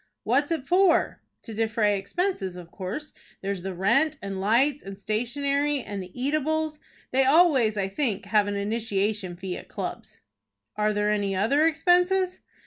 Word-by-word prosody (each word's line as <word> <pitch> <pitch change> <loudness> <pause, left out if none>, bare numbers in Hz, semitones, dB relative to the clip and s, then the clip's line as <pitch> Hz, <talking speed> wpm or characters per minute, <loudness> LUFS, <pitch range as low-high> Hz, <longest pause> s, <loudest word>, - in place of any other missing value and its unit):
"What 260 +6 +2
is 290 - -12
it 310 -5 -2
for?" 365 0 +3 0.2
"To 225 - -8
defray 220 -1 +1
expenses, 200 - -2
of 175 -2 -10
course. 200 +11 -6 0.3
There's 195 -1 -2
the 190 0 -5
rent, 255 - +2
and 195 -1 -5
lights, 255 +8 +2
and 195 0 -9
stationery, 280 +6 -1
and 200 -1 -5
the 185 - -9
eatables. 310 +3 -1 0.3
They 265 +1 +3
always, 270 -7 +4
I 195 -1 0
think, 205 -1 -2
have 205 0 +2
an 205 - -2
initiation 205 -2 -1
fee 185 0 -5
at - - -11
clubs." - - -6 0.6
"Are 210 0 +1
there 210 0 +1
any 200 -2 0
other 275 +11 +3
expenses?" 360 +3 +2
225 Hz, 160 wpm, -26 LUFS, 200-295 Hz, 0.6 s, always